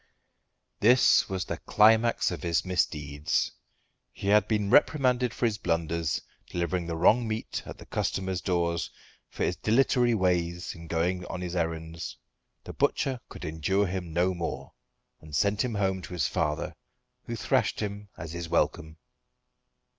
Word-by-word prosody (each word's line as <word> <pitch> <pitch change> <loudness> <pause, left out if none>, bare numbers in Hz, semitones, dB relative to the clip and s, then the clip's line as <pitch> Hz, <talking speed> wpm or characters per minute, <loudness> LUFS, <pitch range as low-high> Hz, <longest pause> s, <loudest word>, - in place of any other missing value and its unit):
This 125 +4 +5
was 95 -1 -2
the - - -4
climax 110 +1 +4
of 85 -5 -5
his 85 +1 0
misdeeds 75 -5 0 0.6
he 100 - -4
had 105 0 +5
been 105 -2 0
reprimanded 125 -5 +4
for 120 - -1
his 110 -3 0
blunders, 85 -3 0 0.3
delivering 85 0 -2
the 85 - -2
wrong 110 +8 +4
meat 110 0 -3
at - - -8
the - - -12
customers' 95 -1 -2
doors; 85 -2 0 0.4
for - - -4
his - - +1
dilatory 120 +1 +3
ways 90 -2 0
in 85 -1 -11
going 85 +3 0
on 95 - -5
his 90 0 -4
errands. 80 -1 -3 0.5
The - - -8
butcher 130 -2 0
could - - -8
endure 80 +6 0
him 90 -2 -4
no 90 +3 +2
more, 85 -2 -5 0.5
and 75 -2 -9
sent 100 +6 +2
him 120 -3 -2
home 95 -2 0
to 90 - -9
his 90 - 0
father, 75 -4 -1 0.5
who - - -3
thrashed - - +1
him, 105 -1 -4
as 80 0 -7
his 85 -1 -5
welcome. 80 0 0
90 Hz, 155 wpm, -28 LUFS, 85-105 Hz, 0.6 s, This